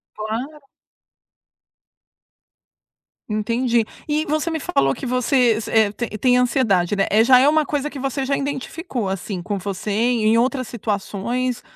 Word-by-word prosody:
Claro. 235 +8 -5 2.7
Entendi. 230 +2 +1 0.2
E 305 +1 0
você 310 +3 -1
me 325 - -2
falou 135 - +1
que - - -7
você 250 0 +2
s 220 - -5
é 220 -2 +4
tem 240 +2 -4
tem 250 +2 +3
ansiedade, 215 -7 +2
né. 195 - +2
Eh, 220 +2 +4
já 255 +1 +7
é 265 +3 +5
uma 310 +1 +3
coisa 290 0 -2
que 290 - -9
você 270 0 -2
já 275 +1 +1
identificou, 275 - -4
assim, 190 0 -4
com 200 +2 -3
você, 195 +2 -5
em 225 +1 +2
outras 255 +1 0
situações? 235 +3 -3
240 Hz, 150 wpm, -21 LUFS, 215-270 Hz, 2.7 s, já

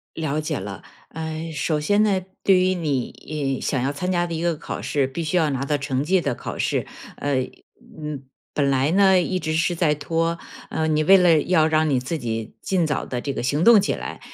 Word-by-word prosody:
了 155 -1 -1
解 150 - -2
了， 100 -1 -7 0.3
哎， 160 0 -5
首 150 +2 0
先 205 +7 +2
呢， 195 -3 +2 0.2
对 190 -2 +5
于 185 0 +2
你， 145 -2 -2
哎， - - -9
想 130 -4 -1
要 135 +2 0
参 180 +6 -2
加 175 -1 +1
的 170 - -5
一 160 - -3
个 170 -2 +1
考 - - -6
试， 140 -3 0
必 165 +5 -4
须 160 +3 0
要 160 -3 +3
拿 135 0 -2
到 145 +1 0
成 135 0 -2
绩 185 +4 +2
的 125 -8 -2
考 - - -6
试， - - 0 0.3
呃， 145 -1 -1 0.6
嗯， 150 -3 -6 0.3
本 140 -2 +1
来 135 +3 +2
呢 190 -1 +5
一 185 +1 -1
直 155 -2 -2
是 170 +2 +1
在 160 -3 +2
拖， 165 +3 -1 0.3
呃， 160 0 -1
你 155 0 +2
为 195 +4 +7
了 170 -4 +5
要 165 -4 +3
让 155 -1 +2
你 135 - +2
自 145 +6 -3
己 115 -4 -4
尽 180 -4 +1
早 150 - -1
的 125 -1 -4
这 140 - -3
个 - - -3
行 145 +6 0
动 230 -1 +8
起 200 - 0
来， - - -6
155 Hz, 245 characters per minute, -23 LUFS, 140-175 Hz, 0.6 s, 动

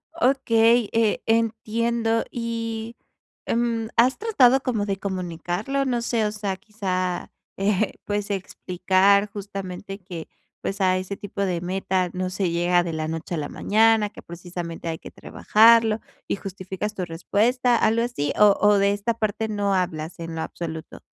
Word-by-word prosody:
Okey, 240 -6 +3
eh, 225 -2 +2
entiendo 225 0 +1
y, 230 -1 -4 0.5
mm, 230 -1 0
¿has 250 +3 +4
tratado 270 - +4
como 230 -6 -1
de 195 -1 -2
comunicarlo? 190 +7 -2
No 245 -3 0
sé, 230 -2 0
o 210 - 0
sea, 205 -2 -3
quizá, 185 -3 -3 0.3
eh, 200 +1 +1
pues, 205 0 -2
explicar 190 +1 +2
justamente 195 -1 -6
que, 175 -3 -8 0.3
pues, 195 0 -3
a 185 -1 +3
ese 185 +2 -5
tipo 205 0 -6
de 180 -3 0
meta 185 0 -1
no 185 0 -2
se 185 -1 -1
llega 175 +1 +2
de 170 -2 -4
la 155 0 -2
noche 165 +2 -4
a - - -3
la 145 -1 -3
mañana, 220 0 +3
que - - -13
precisamente 170 -1 -7
hay 160 - -2
que - - -11
trabajarlo 225 0 +4 0.3
y - - 0
justificas 195 +1 -5
tu 185 - -2
respuesta, 230 +9 +1
algo 225 0 +2
así, 190 -13 -2
o 210 -1 +6
o 210 -1 +5
de 200 0 +3
esta 205 +3 -1
parte 220 0 -2
no 205 -1 0
hablas 170 -2 -2
en 165 -1 -6
lo 160 - -3
absoluto. 160 -1 -6
200 Hz, 160 wpm, -24 LUFS, 180-225 Hz, 0.5 s, o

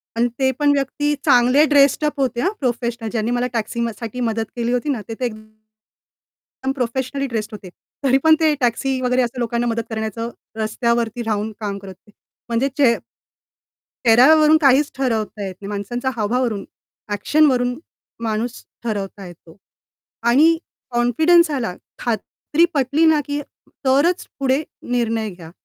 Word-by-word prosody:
आणि 235 +1 +2
ते 265 0 +3
पण 290 -1 +4
व्यक्ती 290 +2 0
चांगले 250 +5 +5
ड्रेस्ड 285 0 +4
अप 295 -1 -2
होते 250 -3 0
हं 380 - +1
प्रोफेशनल 235 -3 -2
ज्यांनी 230 0 -1
मला 245 0 0
टॅक्सी 230 +1 -2
म 235 0 0
साठी 235 +2 -6
मदत 225 -2 -1
केली 240 0 -1
होती 250 +4 -1
ना 250 -6 -1
ते 225 - -3
तर - - -3
एकदम 215 +4 -10
प्रोफेशनल 260 +2 -2
ड्रेस्ड 220 -2 -3
होते. 195 -3 -9 0.3
तरी 265 0 +4
पण 320 0 +7
ते 315 -2 +3
टॅक्सी 260 +2 0
वगैरे 250 0 +2
असं 245 +1 -2
लोकांना 235 0 -1
मदत 230 0 -1
करण्याचं 220 +1 -3 0.3
रस्त्यावरती 235 +1 0
राहून 215 -1 -1
काम 205 -2 -3
करत 195 -1 -10
होते. 210 - -24 0.4
म्हणजे 240 +4 +1
चे 250 -5 +5 1.1
चेहऱ्यावरून 300 +7 +7
काहीच 280 +1 +4
ठरवता 220 -6 -2
येत 190 - -6
नाही. 200 - -7
माणसांचा 225 +6 -3
हावभाव 230 +4 0
वरून 215 -5 -2 0.5
ॲक्शनवरून 250 +3 +2 0.5
माणूस 225 +2 -2 0.2
ठरवता 200 -3 -4
येतो. 170 -1 -14 0.7
आणि 300 +8 +5 0.3
कॉन्फिडन्स 315 +8 +4
आला, 240 -10 -2 0.2
खात्री 245 +7 0
पटली 285 +3 +2
ना 315 -2 +4
की 290 0 -2 0.5
तरच 290 +7 +2
पुढे 270 +2 +2 0.3
निर्णय 230 -3 0
घ्या. 170 -3 -12
240 Hz, 150 wpm, -20 LUFS, 220-275 Hz, 1.1 s, पण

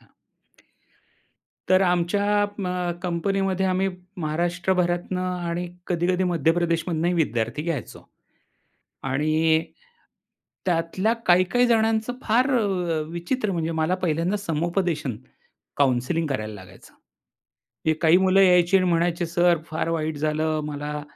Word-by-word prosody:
हां. - - -26 1.6
तर 185 +1 +5
आमच्या 200 +4 +2
अ, 180 -4 -2
कंपनीमध्ये 190 +2 0
आम्ही 190 +1 +1 0.3
महाराष्ट्रभरातुन 175 +2 -1
आणि 180 -1 -3 0.2
कधी-कधी 180 +1 +1
मध्यप्रदेशमधुनही 170 0 +1
विद्यार्थी 120 -4 -1
घ्यायचो. 165 -6 -5 1.0
आणि 155 +4 +1 1.0
त्यातल्या 180 +5 +1
काही-काही 185 +8 +4
जणांचं 225 0 +2
फार 245 +5 +2
अ, 215 - +1 0.4
विचित्र 195 +7 -2
म्हणजे 165 -1 -2
मला 160 +4 +1
पहिल्यांदा 170 +4 0
समुपदेशन 170 - -2 0.6
काउंसलिंग 140 +4 +1
करायला 110 -6 -3
लागायचं. 95 -2 -14 0.9
ही 160 - +3
काही 165 +2 +6
मुलं 190 +1 +4
यायची 180 0 +5
आणि 185 -1 +2
म्हणायचे, 170 +1 +1
"सर 175 0 +3
फार 155 +1 -3
वाईट 160 -2 -2
झालं, 155 +1 0
मला 150 0 -5
175 Hz, 105 wpm, -24 LUFS, 160-185 Hz, 1.6 s, काही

